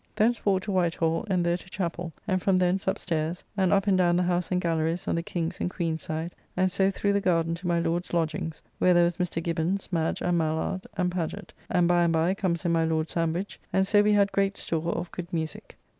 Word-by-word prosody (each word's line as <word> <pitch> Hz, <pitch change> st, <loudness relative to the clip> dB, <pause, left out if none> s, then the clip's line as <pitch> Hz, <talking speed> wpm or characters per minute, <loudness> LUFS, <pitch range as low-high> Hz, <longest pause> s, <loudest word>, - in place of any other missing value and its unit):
Thence 230 Hz, +3 st, +2 dB
walked 190 Hz, -2 st, +2 dB
to 205 Hz, -, -2 dB
White 175 Hz, -3 st, +1 dB
Hall, 165 Hz, +3 st, 0 dB
and 180 Hz, -3 st, +1 dB
there 170 Hz, 0 st, +2 dB
to 180 Hz, -, -14 dB
chappell, 175 Hz, -2 st, -3 dB, 0.2 s
and 185 Hz, 0 st, +1 dB
from 190 Hz, 0 st, +3 dB
thence 185 Hz, +1 st, +1 dB
up 190 Hz, -, +1 dB
stairs, 165 Hz, 0 st, -2 dB
and 190 Hz, -3 st, +2 dB
up 195 Hz, -1 st, +3 dB
and 200 Hz, -2 st, +3 dB
down 175 Hz, -2 st, +3 dB
the 180 Hz, -, +2 dB
house 175 Hz, 0 st, 0 dB
and 180 Hz, -, +2 dB
gallerys 165 Hz, 0 st, -1 dB
on -, -, +1 dB
the 170 Hz, -, 0 dB
King's 170 Hz, -1 st, -3 dB
and -, -, -1 dB
Queen's 165 Hz, -3 st, -2 dB
side, 160 Hz, +2 st, -4 dB, 0.2 s
and 185 Hz, 0 st, +2 dB
so 195 Hz, 0 st, +3 dB
through 200 Hz, +1 st, 0 dB
the 200 Hz, -, +2 dB
garden 165 Hz, -3 st, +1 dB
to 175 Hz, +2 st, -5 dB
my 170 Hz, -1 st, +2 dB
Lord's 170 Hz, +2 st, -1 dB
lodgings, 160 Hz, -1 st, -2 dB, 0.2 s
where 180 Hz, -1 st, +4 dB
there 175 Hz, -, +6 dB
was 170 Hz, 0 st, +1 dB
Mr. 175 Hz, -2 st, -2 dB
Gibbons, 170 Hz, +4 st, -1 dB
Madge, 165 Hz, -2 st, 0 dB
and 175 Hz, -1 st, +2 dB
Mallard, 160 Hz, +4 st, -1 dB
and 180 Hz, -1 st, +1 dB
Pagett; 175 Hz, -3 st, -4 dB, 0.2 s
and 175 Hz, -1 st, +3 dB
by 175 Hz, 0 st, +4 dB
and 170 Hz, -1 st, +3 dB
by 165 Hz, +3 st, +2 dB
comes 185 Hz, -3 st, -1 dB
in 170 Hz, -, +2 dB
my 165 Hz, -1 st, +3 dB
Lord 160 Hz, 0 st, 0 dB
Sandwich, 165 Hz, +4 st, -2 dB
and 190 Hz, 0 st, +3 dB
so 205 Hz, +1 st, +4 dB
we 210 Hz, 0 st, +3 dB
had 200 Hz, -1 st, +3 dB
great 195 Hz, 0 st, +1 dB
store 165 Hz, +1 st, -2 dB
of 175 Hz, -, -4 dB
good 175 Hz, 0 st, -7 dB
musique. 160 Hz, -2 st, -4 dB
175 Hz, 245 wpm, -27 LUFS, 165-185 Hz, 0.2 s, there